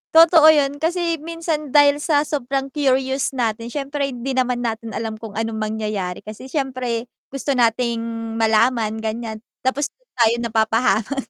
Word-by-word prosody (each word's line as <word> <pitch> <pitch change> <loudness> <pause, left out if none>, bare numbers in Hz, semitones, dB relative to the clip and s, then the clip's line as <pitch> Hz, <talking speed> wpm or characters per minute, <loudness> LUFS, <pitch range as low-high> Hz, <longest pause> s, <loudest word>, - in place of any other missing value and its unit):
Totoo 325 -1 +8
yun 285 -2 +4
kasi 335 0 0
minsan 315 -2 -4
dahil 290 0 +6
sa 295 -1 +2
sobrang 275 -2 -2
curious 265 -1 0
natin, 230 -2 -1
siyempre 280 +2 -3
hindi 260 0 -4
naman 250 -2 0
natin 225 -1 -4
alam 220 -1 -4
kung 220 -2 -9
anong 225 0 -2
mangyayari 215 -4 -3
kasi 215 +4 -9
syempre 255 -5 -2 0.2
gusto 275 +1 -3
nating 235 -2 +1 0.4
malaman 225 0 +2
gan'yan, 220 0 -4 0.2
tapos 265 +3 -1 0.2
tayo 235 -2 +4
napapahama 225 +2 +1
255 Hz, 140 wpm, -21 LUFS, 225-285 Hz, 0.4 s, Totoo